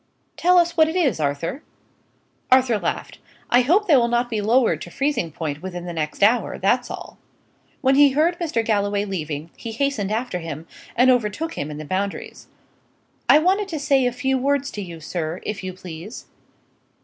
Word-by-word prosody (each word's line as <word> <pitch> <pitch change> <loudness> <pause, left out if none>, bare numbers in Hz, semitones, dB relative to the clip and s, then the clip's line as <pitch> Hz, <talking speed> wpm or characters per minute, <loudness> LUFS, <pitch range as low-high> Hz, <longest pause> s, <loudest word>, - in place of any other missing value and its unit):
Tell 360 +1 +4
us 345 -1 +3
what 315 -1 +5
it 320 - -4
is, 285 - +1
Arthur?" 150 - -2 0.9
Arthur 255 -4 +4
laughed. - - -4 0.3
"I 245 - +6
hope 355 - +3
they 315 - +6
will 240 -3 +4
not 240 +1 0
be 215 -2 -1
lowered 230 +4 +2
to - - -7
freezing 270 - -1
point 150 -1 -4
within 180 -2 -6
the 175 - -5
next 155 +3 -2
hour; 225 +1 +3
that's 245 +6 +1
all." - - -8 0.6
When 265 -2 +3
he 285 +1 +7
heard 325 +5 +2
Mr. 300 -10 -1
Galloway 205 -1 +1
leaving, 160 -5 -5
he 230 - -7
hastened 225 -4 -1
after 220 -4 -2
him, 165 -1 -7 0.3
and 255 +2 +5
overtook 250 +7 -1
him 145 - -4
in 150 - -7
the 155 - -7
Boundaries. 195 +5 -4 0.8
"I - - +9
wanted 380 +6 +2
to 325 -5 -4
say 275 -3 +3
a - - 0
few 265 +2 0
words 280 +1 0
to 205 - -5
you, 170 -4 -8
sir, 160 +1 -4
if 210 -2 -5
you 185 - -4
please?" 185 +4 -9
230 Hz, 185 wpm, -22 LUFS, 180-280 Hz, 0.9 s, I